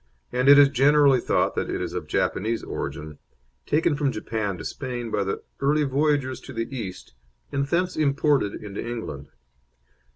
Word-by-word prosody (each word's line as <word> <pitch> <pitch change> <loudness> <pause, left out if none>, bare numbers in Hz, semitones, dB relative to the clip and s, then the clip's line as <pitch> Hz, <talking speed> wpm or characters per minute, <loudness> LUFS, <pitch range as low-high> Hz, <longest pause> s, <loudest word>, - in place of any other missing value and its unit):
and 125 +2 +2
it 140 - +10
is 145 -1 +8
generally 140 0 +5
thought - - +1
that - - -2
it - - -2
is - - -4
of - - -4
Japanese 115 +3 -1
origin, 75 0 -6 0.5
taken 155 +1 +2
from 145 -2 0
Japan 110 -4 -3
to - - -8
Spain 120 -4 -5
by 100 - +1
the 95 - -3 0.2
early 150 +2 +2
voyagers 140 -1 0
to 135 - -10
the 115 -1 -2
East, 95 - -7 0.4
and 140 0 -1
thence 180 +4 0
imported 140 -7 +1
into 100 -1 -6
England. 110 - -6
130 Hz, 165 wpm, -25 LUFS, 110-145 Hz, 0.5 s, it